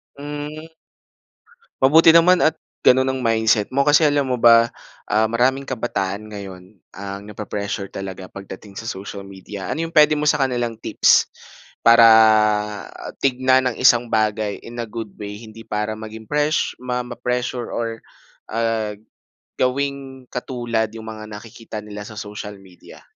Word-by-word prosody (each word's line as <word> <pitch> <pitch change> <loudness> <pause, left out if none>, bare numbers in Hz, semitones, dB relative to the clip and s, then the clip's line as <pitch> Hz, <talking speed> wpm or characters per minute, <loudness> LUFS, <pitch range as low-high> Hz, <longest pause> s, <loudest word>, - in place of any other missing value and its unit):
Hmm. 145 +2 -7 1.2
Mabuti 155 +5 +6
naman 175 +2 +6
at 160 - +3 0.3
ganun 130 +1 +5
ang 130 0 -4
mindset 110 -2 +2
mo. 140 +1 +1
Kasi 150 +1 +5
alam 145 -1 +1
mo 125 - 0
ba? 115 0 +6 0.3
Ah, 110 +1 +2
maraming 130 +4 +1
kabataan 110 -4 -3
ngayon 95 -1 -10 0.2
ang 100 0 -6
nape-pressure 100 -1 -5
talaga 95 -1 -6
pagdating 100 +1 -10
sa 115 - -5
social 100 -1 -7
media. 95 0 -9
Ano 165 - -2
yung 165 - -9
pwede 150 -1 +5
mo 150 - -1
sa 150 -1 +2
kanilang 120 -4 -1
tips - - +3 0.6
para 115 0 +8 1.2
tignan 130 0 +3
ang - - -14
isang 120 -2 +4
bagay 110 -2 0
in 120 +1 -10
a - - -4
good 110 0 -7
way 105 0 -7
hindi 115 0 -12
para 105 0 -3
maging 110 0 -10
pres 150 +1 0
ma-pressure 125 0 -3
or 115 -1 -3 1.6
gawing 135 0 -2
katulad 120 -3 -2
yung 110 0 -8
mga 110 -1 -8
nakikita 110 +1 -9
nila 105 0 -8
sa 110 +1 -11
social 105 -1 -7
media? 95 -2 -16
115 Hz, 140 wpm, -21 LUFS, 105-130 Hz, 1.6 s, para